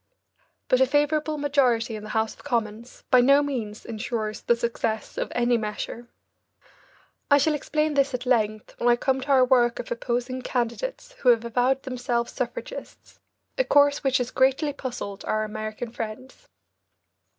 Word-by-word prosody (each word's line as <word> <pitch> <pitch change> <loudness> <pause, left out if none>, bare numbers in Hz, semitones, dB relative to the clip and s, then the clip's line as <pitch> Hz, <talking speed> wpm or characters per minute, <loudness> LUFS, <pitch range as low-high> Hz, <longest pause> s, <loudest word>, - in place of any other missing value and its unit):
But 255 - +3
a 260 - +5
favourable 300 +2 +1
majority 255 -5 +1
in 215 - -6
the 215 - -8
House 220 0 0
of - - -18
Commons 230 -3 -3
by 255 -1 +7
no 275 +3 +5
means 230 -7 -4
insures 220 -1 -4
the 235 - +2
success 230 -2 -2
of - - -3
any 240 -1 +2
measure. 215 +2 -5 1.2
I 285 - +7
shall 305 +2 +2
explain 305 +1 -1
this 275 -1 +2
at 250 0 -5
length 215 -4 0
when 240 - +2
I 240 - +6
come 265 +2 0
to 260 - -7
our 265 -2 +5
work 240 -2 +3
of - - -7
opposing 245 +2 -2
candidates 250 - -3
who 250 - +3
have 235 -1 +4
avowed 250 +3 +1
themselves 245 -2 -2
suffragists, 485 - -7 0.4
a - - +5
course 285 -7 +4
which 270 -1 +3
has 250 -1 -2
greatly 270 +3 +2
puzzled 240 -7 -6
our 215 0 0
American 215 +2 -5
friends. 235 - -7
245 Hz, 160 wpm, -25 LUFS, 230-275 Hz, 1.2 s, by